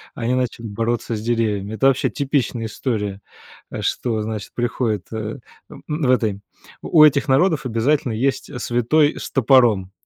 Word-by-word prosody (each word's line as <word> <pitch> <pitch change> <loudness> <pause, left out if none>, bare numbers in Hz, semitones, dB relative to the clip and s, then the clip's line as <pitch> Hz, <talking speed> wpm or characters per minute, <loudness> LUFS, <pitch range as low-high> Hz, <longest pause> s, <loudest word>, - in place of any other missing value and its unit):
они 120 +1 -1
начали 125 -2 -2
бороться 115 +2 -2
с 105 - -5
деревьями. 110 -3 -1
Это 135 - 0
вообще 135 -1 +2
типичная 135 -5 -1
история. 105 -4 -3 0.5
Э, - - -5
что, 110 -3 -1
значит, 110 -2 -6
приходит, 120 -4 -1
э, 110 +2 -4 0.3
н - - -11 0.3
в 125 - +4
этой 105 -5 0 0.4
у 155 -2 +5
этих 145 0 +4
народов 150 +2 +2
обязательно 120 +2 0
есть, 130 +5 -1
э, - - -7
святой 135 +7 +2
с - - -6
топором. 120 -7 +3
120 Hz, 155 wpm, -21 LUFS, 110-135 Hz, 0.5 s, у